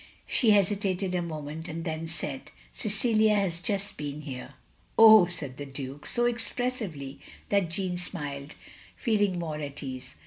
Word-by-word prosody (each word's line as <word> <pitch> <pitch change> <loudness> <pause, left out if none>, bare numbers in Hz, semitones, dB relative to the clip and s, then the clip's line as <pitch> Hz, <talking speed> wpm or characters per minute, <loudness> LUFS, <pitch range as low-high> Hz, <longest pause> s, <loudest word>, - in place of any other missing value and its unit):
She 235 - +3
hesitated 195 -2 +2
a 180 - +1
moment, 155 -1 -5
and 165 0 -5
then 160 0 -3
said, 150 -4 -5 0.2
"Cecilia 215 0 +2
has 180 -4 0
just 200 +1 -2
been 145 0 -4
here." 130 -4 -7 0.4
"Oh!" 220 -5 +10
said 150 -7 -5
the 145 - -5
Duke, 135 +1 -7
so 240 0 +1
expressively 230 - -2 0.3
that 200 -4 +2
Jeanne 180 0 -2
smiled, 145 -5 -4 0.4
feeling 205 -6 +1
more 160 -3 -3
at 145 0 -6
ease. 130 -1 -6
175 Hz, 145 wpm, -28 LUFS, 145-205 Hz, 0.4 s, Oh